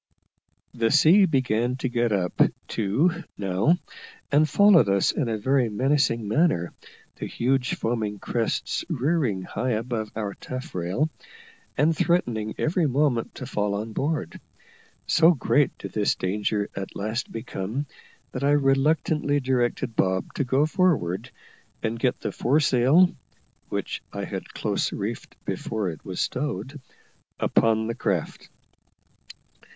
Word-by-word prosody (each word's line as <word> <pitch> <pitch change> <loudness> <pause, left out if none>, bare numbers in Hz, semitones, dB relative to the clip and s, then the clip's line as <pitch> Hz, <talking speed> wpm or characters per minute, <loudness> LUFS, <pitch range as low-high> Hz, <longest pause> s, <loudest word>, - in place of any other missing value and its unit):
The 115 -1 +1
sea 165 - +6
began 125 -4 +1
to 130 0 -2
get 120 -2 0
up, 95 -3 0 0.3
too, 155 - 0
now, 100 - +2 0.5
and 150 +2 +4
followed 200 - +6
us 100 -1 +3
in 135 -7 -1
a 110 - -1
very 130 +2 +2
menacing 120 -1 +1
manner, 110 - +1 0.4
the - - -4
huge 125 +1 0
foaming 110 -3 -2
crests 115 +3 -2
rearing 140 - 0
high 120 +6 -2
above 110 -1 -3
our 105 -2 -3
taffrail, 130 - -3 0.7
and 155 +4 +3
threatening 120 -12 0
every 160 0 +1
moment 135 -3 0
to 130 - -6
fall 105 -5 -1
on 110 +2 -4
board. 140 - -2 0.6
So 165 +2 +5
great 145 +1 +1
did - - -7
this 105 -1 +1
danger 100 +2 -1
at 95 -1 -6
last 110 +5 -3
become, 115 +4 -4 0.5
that 130 - -4
I 145 +1 +4
reluctantly 145 +1 +2
directed 125 -2 -1
Bob 95 -1 0
to - - -1
go 135 +3 +2
forward 135 - +1 0.5
and 115 +1 -2
get 125 +1 0
the - - -2
foresail 140 +5 +3 0.5
(which - - -3
I - - -5
had - - -6
close - - -1
reefed - - -5
before 110 -4 -2
it 80 - -12
was 95 -2 -6
stowed) 145 -1 -3 0.6
upon 110 -1 +2
the 115 - -2
craft. - - -3
125 Hz, 130 wpm, -25 LUFS, 110-145 Hz, 0.7 s, sea